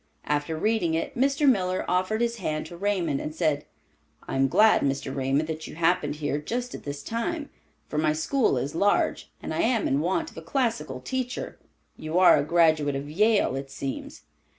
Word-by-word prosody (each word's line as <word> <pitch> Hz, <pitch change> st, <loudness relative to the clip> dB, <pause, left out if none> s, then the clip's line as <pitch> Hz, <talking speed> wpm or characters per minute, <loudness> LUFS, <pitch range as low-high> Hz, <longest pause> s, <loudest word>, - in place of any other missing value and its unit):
After 150 Hz, +2 st, -1 dB
reading 180 Hz, -3 st, +1 dB
it, 165 Hz, -, -3 dB
Mr. 280 Hz, +3 st, +2 dB
Miller 185 Hz, -7 st, +2 dB
offered 185 Hz, +5 st, 0 dB
his 235 Hz, 0 st, 0 dB
hand 155 Hz, -6 st, -3 dB
to 170 Hz, -, -9 dB
Raymond, 175 Hz, -6 st, 0 dB
and 155 Hz, -, -5 dB
said, 155 Hz, -4 st, 0 dB, 0.6 s
"I -, -, -4 dB
am 135 Hz, 0 st, +3 dB
glad, 215 Hz, +11 st, +5 dB
Mr. 135 Hz, -1 st, -1 dB
Raymond, 135 Hz, +3 st, 0 dB
that 160 Hz, 0 st, -5 dB
you -, -, -9 dB
happened 170 Hz, -2 st, +1 dB
here 145 Hz, -1 st, -2 dB
just 245 Hz, +9 st, -3 dB
at -, -, -9 dB
this 145 Hz, 0 st, -5 dB
time, 290 Hz, +7 st, -3 dB, 0.4 s
for 150 Hz, -, -2 dB
my 155 Hz, 0 st, +2 dB
school 160 Hz, -, +1 dB
is 135 Hz, +4 st, -2 dB
large, 200 Hz, +5 st, +1 dB
and -, -, -4 dB
I -, -, -2 dB
am 230 Hz, -2 st, +2 dB
in 135 Hz, -, +1 dB
want 190 Hz, -, -1 dB
of -, -, -18 dB
a -, -, -6 dB
classical 155 Hz, -, -2 dB
teacher. 255 Hz, -, -4 dB, 0.4 s
You 155 Hz, +2 st, -3 dB
are 185 Hz, 0 st, +7 dB
a -, -, +1 dB
graduate 155 Hz, -3 st, +3 dB
of 140 Hz, +2 st, -5 dB
Yale, 210 Hz, -, +3 dB
it 135 Hz, 0 st, -5 dB
seems?" 135 Hz, 0 st, -6 dB
165 Hz, 195 wpm, -26 LUFS, 145-220 Hz, 0.6 s, are